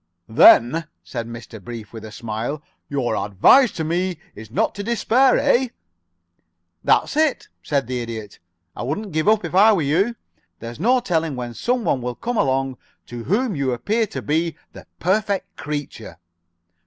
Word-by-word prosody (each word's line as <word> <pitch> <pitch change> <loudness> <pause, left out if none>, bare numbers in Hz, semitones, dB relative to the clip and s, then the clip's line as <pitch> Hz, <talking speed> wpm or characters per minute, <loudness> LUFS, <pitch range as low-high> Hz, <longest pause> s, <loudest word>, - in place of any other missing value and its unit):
"Then," 120 +7 +6 0.2
said 115 -3 -5
Mr. 115 -2 -10
Brief, 115 -2 -8
with 110 -1 -8
a 110 - -9
smile, 115 +7 -4 0.3
"your 135 -4 -1
advice 145 - +4
to 160 - -3
me 175 +2 -1 0.2
is 110 0 -11
not 115 - 0
to 200 - -6
despair, 235 +3 +3
eh?" 265 -2 +3 1.2
"That's - - +2
it," 310 -2 +1
said 140 -2 -1
the 125 0 -3
Idiot. 110 -3 -7 0.4
"I - - -6
wouldn't 190 - -3
give 155 +2 -1
up, 215 -3 +3
if 165 - -6
I 210 +4 +6
were 175 -6 +1
you. 190 +12 +1 0.4
There's 115 - -8
no 250 +7 +3
telling 165 - -1
when 120 -1 -5
some 245 - -1
one 130 - 0
will 125 0 -4
come 245 - -4
along 135 -3 0 0.3
to 120 -1 -8
whom 220 +1 0
you 135 -3 0
appear 215 - 0
to - - -6
be 160 +2 0 0.2
the - - -13
perfect 200 +2 0
creature." 145 - -6
150 Hz, 165 wpm, -21 LUFS, -, 1.2 s, Then